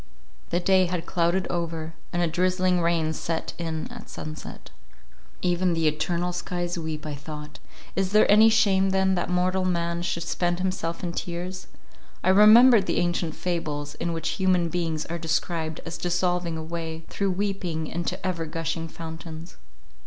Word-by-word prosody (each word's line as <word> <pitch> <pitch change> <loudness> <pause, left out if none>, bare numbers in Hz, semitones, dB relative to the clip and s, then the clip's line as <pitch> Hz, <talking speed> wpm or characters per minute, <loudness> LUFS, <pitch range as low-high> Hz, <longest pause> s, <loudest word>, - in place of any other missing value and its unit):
The 175 - +1
day 185 0 +4
had 175 -1 -3
clouded 175 +2 +1
over, 165 -2 -3 0.2
and 175 0 +1
a - - +2
drizzling 180 +1 +2
rain 165 -2 +1
set 165 +1 -3
in 160 -2 -3
at - - -10
sunset. 155 0 -8 0.7
Even 175 -1 +2
the 165 -1 +2
eternal 175 +3 0
skies 175 -1 -3
weep, 160 -3 -4
I 150 - -3
thought; 150 +1 -8 0.4
is 190 0 0
there 215 +1 +6
any 215 +2 +7
shame 195 -4 +4
then, 190 0 +2
that 180 - -1
mortal 185 +1 +1
man 170 -1 0
should 170 -1 -2
spend 175 +1 0
himself 180 -2 -2
in 175 - -1
tears? 180 +2 -5 0.6
I 185 - +3
remembered 215 +2 +8
the - - 0
ancient 175 -2 0
fables, 150 -5 -3
in 170 +2 -3
which 165 0 -2
human 180 -3 +3
beings 165 -3 -2
are 170 +1 -4
described 160 -1 -1
as 165 0 -5
dissolving 175 -1 0
away 160 0 -5
through 200 -1 -1
weeping 180 -5 -2
into 170 +3 -3
ever 170 -3 -1
gushing 165 +1 -3
fountains. 165 +1 -8
170 Hz, 160 wpm, -26 LUFS, 165-185 Hz, 0.7 s, remembered